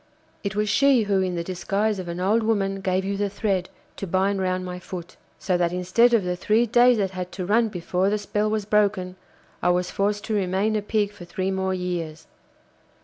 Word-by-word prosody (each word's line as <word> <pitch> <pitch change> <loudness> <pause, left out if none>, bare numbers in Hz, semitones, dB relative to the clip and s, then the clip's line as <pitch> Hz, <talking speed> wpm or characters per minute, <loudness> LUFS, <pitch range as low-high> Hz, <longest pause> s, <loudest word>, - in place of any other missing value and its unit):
It 200 -1 -3
was 210 0 0
she 270 +2 +4
who 200 -2 +1
in 185 -1 -1
the 170 - -2
disguise 195 +4 -1
of 180 - -6
an 170 +1 -4
old 205 +5 +2
woman 195 -3 0
gave 185 0 0
you 200 0 -2
the 205 0 0
thread 195 -3 -1 0.3
to 195 - -5
bind 190 +2 +1
round 185 0 -1
my 180 0 -6
foot. 175 -1 -8 0.2
So 185 -2 0
that 175 -1 +1
instead 185 +7 +3
of 215 - +2
the 180 0 -1
three 215 +6 +2
days 240 +1 +5
that 195 -3 0
had 180 -1 -5
to 185 - -4
run 225 +4 +3
before 180 0 -1
the 210 - +1
spell 210 +1 -1
was 215 -1 -1
broken, 200 -3 +1 0.5
I 175 - +2
was 180 0 +1
forced 205 +1 0
to 220 - -3
remain 200 +2 +1
a 210 - +1
Pig 205 0 0
for 175 - -11
three 185 +2 -2
more 190 0 -1
years. 175 -4 -4
195 Hz, 215 wpm, -24 LUFS, 180-210 Hz, 0.5 s, days